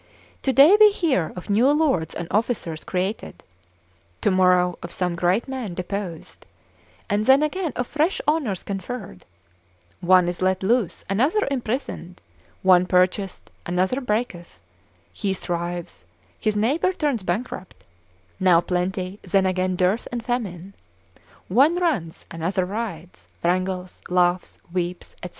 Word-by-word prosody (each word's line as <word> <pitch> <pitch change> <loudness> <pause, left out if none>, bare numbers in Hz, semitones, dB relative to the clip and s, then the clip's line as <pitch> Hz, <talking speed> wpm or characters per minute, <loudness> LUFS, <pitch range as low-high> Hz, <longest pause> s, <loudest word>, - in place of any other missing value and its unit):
Today 275 - +6
we 425 0 +9
hear 310 - 0
of 180 - -8
new 230 +7 +4
lords 280 - +1
and 170 - -4
officers 200 -7 -1
created, 190 +4 -3 0.8
tomorrow 180 -2 +3
of 170 - -7
some 180 -1 -1
great 180 +7 +1
men 255 -9 -5
deposed, 185 -2 -6 0.6
and 205 0 +1
then 270 +3 +6
again 325 +2 -1
of 245 - -1
fresh 305 +8 0
honours 285 - 0
conferred; 195 - -6 0.7
one 180 0 +4
is 175 +1 -4
let 185 0 +1
loose, 225 -2 0
another 275 - +1
imprisoned; 235 -8 -4 0.4
one 180 -1 +5
purchaseth, 185 +1 0 0.2
another 185 +9 0
breaketh: 210 - -3 0.5
he 195 -2 -2
thrives, 175 - -4 0.4
his 215 -1 0
neighbour 280 - +1
turns 290 - -1
bankrupt; 185 0 -4 0.6
now 180 -3 +5
plenty, 185 +2 -2
then 190 +1 +1
again 185 0 0
dearth 185 +5 +1
and 240 -2 -4
famine; 200 -7 -3 0.7
one 275 - +4
runs, 290 - -1
another 175 +3 -1
rides, 185 -4 -6 0.2
wrangles, 185 +1 -1
laughs, 180 0 +1 0.2
weeps, 180 -1 -3
&c. 180 - -4
190 Hz, 125 wpm, -23 LUFS, 180-245 Hz, 0.8 s, we